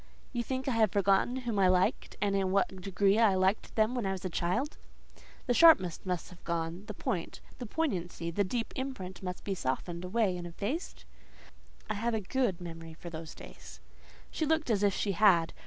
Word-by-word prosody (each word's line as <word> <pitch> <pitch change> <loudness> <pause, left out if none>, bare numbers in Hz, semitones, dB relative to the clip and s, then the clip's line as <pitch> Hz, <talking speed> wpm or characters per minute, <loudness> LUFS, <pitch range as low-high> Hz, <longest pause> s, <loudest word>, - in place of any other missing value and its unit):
"You 240 - 0
think 260 +3 -3
I - - +2
have 220 -4 +3
forgotten 200 +4 +2
whom 240 -5 -2
I 190 - +5
liked, 185 0 +1
and 200 -1 +1
in 195 -1 +1
what 190 -1 0
degree 195 +2 +2
I 215 -4 +5
liked 190 +3 +1
them 220 +2 +3
when 240 -6 -1
a 190 0 -1
child?" 185 - -2 0.7
"The 245 - +2
sharpness 240 - +6
must 180 -2 -3
be 180 - -12
gone—the 170 +5 -3
point, 175 -3 -3 0.2
the 245 - -5
poignancy—the 180 - -1
deep 230 +4 -3
imprint 255 -9 -5
must 180 -1 -5
be 200 - -2
softened 170 +2 -3
away 190 0 +1
and 175 0 -6
effaced?" 215 - -4 0.8
"I 215 - -1
have 225 +2 -1
a - - 0
good 210 -2 0
memory 165 -2 -8
for 170 +1 -9
those 160 -1 -7
days." - - -12 0.5
She - - -2
looked 315 -4 +1
as 205 -3 +2
if 200 -2 +3
she 205 - 0
had. 185 -4 +4
195 Hz, 185 wpm, -31 LUFS, 180-230 Hz, 0.8 s, sharpness